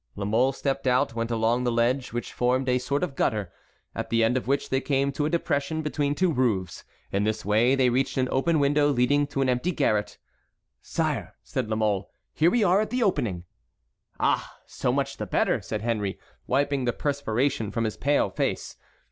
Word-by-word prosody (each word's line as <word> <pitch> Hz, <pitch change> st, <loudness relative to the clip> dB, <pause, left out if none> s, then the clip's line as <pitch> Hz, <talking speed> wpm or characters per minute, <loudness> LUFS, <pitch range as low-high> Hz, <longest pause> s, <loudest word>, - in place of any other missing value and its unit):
La 100 Hz, -, -4 dB
Mole 115 Hz, +6 st, +2 dB
stepped 135 Hz, 0 st, -2 dB
out, 125 Hz, +1 st, +2 dB
went 115 Hz, 0 st, -2 dB
along 115 Hz, +1 st, +1 dB
the 120 Hz, -, +1 dB
ledge, 120 Hz, +3 st, +1 dB
which 120 Hz, 0 st, -4 dB
formed 125 Hz, +2 st, +1 dB
a 125 Hz, 0 st, +2 dB
sort 140 Hz, +4 st, -1 dB
of 155 Hz, -7 st, -3 dB
gutter, 105 Hz, -8 st, -1 dB, 0.4 s
at -, -, -4 dB
the 115 Hz, 0 st, +2 dB
end 115 Hz, +3 st, +2 dB
of 130 Hz, -, -2 dB
which 140 Hz, +1 st, 0 dB
they 135 Hz, 0 st, +1 dB
came 140 Hz, -1 st, +1 dB
to 145 Hz, +2 st, -1 dB
a -, -, -1 dB
depression 160 Hz, -2 st, -1 dB
between 145 Hz, -1 st, -1 dB
two 180 Hz, -1 st, +2 dB
roofs. 100 Hz, -, -1 dB, 0.3 s
In 100 Hz, +1 st, +1 dB
this 110 Hz, 0 st, -1 dB
way 110 Hz, +6 st, +3 dB
they 130 Hz, -2 st, +3 dB
reached 130 Hz, +2 st, 0 dB
an 130 Hz, -1 st, +2 dB
open 155 Hz, +4 st, +2 dB
window 145 Hz, +1 st, +3 dB
leading 145 Hz, +2 st, +2 dB
to 140 Hz, -1 st, -2 dB
an -, -, 0 dB
empty 125 Hz, +8 st, +1 dB
garret. 105 Hz, -10 st, 0 dB, 0.6 s
"Sire," -, -, -2 dB
said 125 Hz, -4 st, -3 dB
La 110 Hz, -, 0 dB
Mole, 105 Hz, -3 st, 0 dB, 0.2 s
"here 160 Hz, +2 st, +4 dB
we 235 Hz, +3 st, +2 dB
are 190 Hz, +1 st, +4 dB
at 215 Hz, -, -2 dB
the 250 Hz, -1 st, 0 dB
opening." 105 Hz, -, 0 dB, 0.8 s
"Ah! -, -, 0 dB
so -, -, -2 dB
much -, -, -1 dB
the -, -, -4 dB
better," -, -, +1 dB
said 105 Hz, -1 st, -4 dB
Henry, 105 Hz, -4 st, -1 dB, 0.3 s
wiping 140 Hz, 0 st, +1 dB
the 120 Hz, -, +1 dB
perspiration 140 Hz, -4 st, -1 dB
from 115 Hz, +2 st, -2 dB
his 110 Hz, -2 st, -2 dB
pale 145 Hz, +2 st, +1 dB
face. -, -, -2 dB
130 Hz, 200 wpm, -26 LUFS, 115-145 Hz, 0.8 s, here